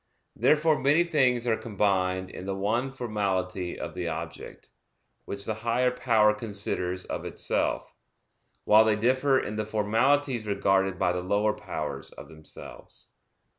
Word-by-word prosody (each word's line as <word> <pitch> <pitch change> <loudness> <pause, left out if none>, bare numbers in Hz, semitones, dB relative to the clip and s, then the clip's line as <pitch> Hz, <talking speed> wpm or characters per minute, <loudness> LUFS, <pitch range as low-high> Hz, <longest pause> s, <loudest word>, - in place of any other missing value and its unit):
Therefore 155 0 +3
many 145 +5 +4
things 130 -8 +2
are 115 -2 +2
combined 95 -4 0
in 95 - -8
the 95 - -2
one 115 +7 -1
formality 95 -7 -2
of - - -5
the 90 -1 -4
object, 80 0 -7 0.6
which 100 0 -3
the 110 - -1
higher 120 +2 +2
power 115 -4 +3
considers 100 -4 -3
of - - -5
itself; - - -2 0.7
while 110 +1 +6
they 110 -1 +2
differ 130 +5 +2
in 105 -3 -4
the 110 - 0
formalities 115 +3 +1
regarded 95 -2 +1
by 90 -2 +2
the 90 - -2
lower 100 +3 +1
powers - - -5
of - - -11
themselves. 80 -1 -10
105 Hz, 140 wpm, -27 LUFS, 95-125 Hz, 0.7 s, while